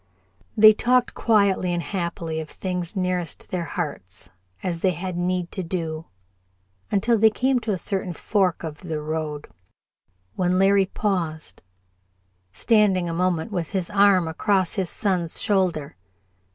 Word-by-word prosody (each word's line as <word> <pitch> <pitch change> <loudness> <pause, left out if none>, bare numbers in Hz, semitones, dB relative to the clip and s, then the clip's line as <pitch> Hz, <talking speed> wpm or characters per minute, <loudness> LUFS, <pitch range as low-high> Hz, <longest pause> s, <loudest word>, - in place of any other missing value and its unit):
They 215 0 +9
talked 250 +3 +2
quietly 200 -5 +2
and 175 -1 -1
happily 170 -4 -3
of 155 -1 -6
things 180 0 -4
nearest 180 -3 -2
their 175 -2 -2
hearts, 95 - -6 0.3
as 170 -2 -3
they 185 -2 +2
had 180 +2 -5
need 175 0 -1
to 190 - -3
do, 165 -2 -4 0.8
until 225 +3 +2
they 220 +1 +6
came 255 +4 +1
to 225 -2 -3
a 195 - 0
certain 190 0 -2
fork 190 -3 0
of 155 -2 -6
the 160 -4 -4
road, 150 -1 -4 0.9
when 180 0 +1
Larry 195 0 +4
paused, 175 -7 -3 0.9
standing 190 - +2
a 165 - -3
moment 180 +3 0
with 175 -2 -3
his 190 -1 -2
arm 200 -4 +4
across 185 +2 0
his 190 -4 -2
son's 180 -6 -1
shoulder. 180 -8 0
180 Hz, 140 wpm, -23 LUFS, 165-200 Hz, 0.9 s, They